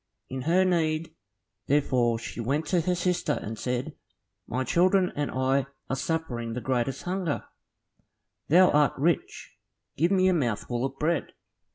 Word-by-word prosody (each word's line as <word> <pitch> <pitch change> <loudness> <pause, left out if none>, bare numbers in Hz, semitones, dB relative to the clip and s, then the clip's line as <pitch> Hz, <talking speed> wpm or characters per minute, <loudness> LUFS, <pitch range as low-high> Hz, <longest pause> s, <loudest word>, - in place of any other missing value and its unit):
In 130 0 -3
her 185 +2 +4
need, 160 -3 0 0.5
therefore, 130 -5 +2
she 115 - -7
went 140 +7 -1
to 180 -2 +3
her 180 +2 0
sister, 180 -3 0
and 110 +1 -6
said, 125 0 -2 0.5
"My 130 +2 -1
children 180 +7 +3
and 145 -1 -1
I 130 +1 +1 0.2
are - - +1
suffering 130 -6 -3
the 125 - -3
greatest 130 +1 -1
hunger; 180 -4 -2 1.0
thou 180 +4 +6
art 150 -1 +3
rich, 160 +3 -1 0.4
give 170 +4 +3
me 185 -1 +3
a 185 - +4
mouthful 120 -4 -1
of 135 0 -5
bread." 160 +2 -1
145 Hz, 150 wpm, -27 LUFS, 130-175 Hz, 1.0 s, thou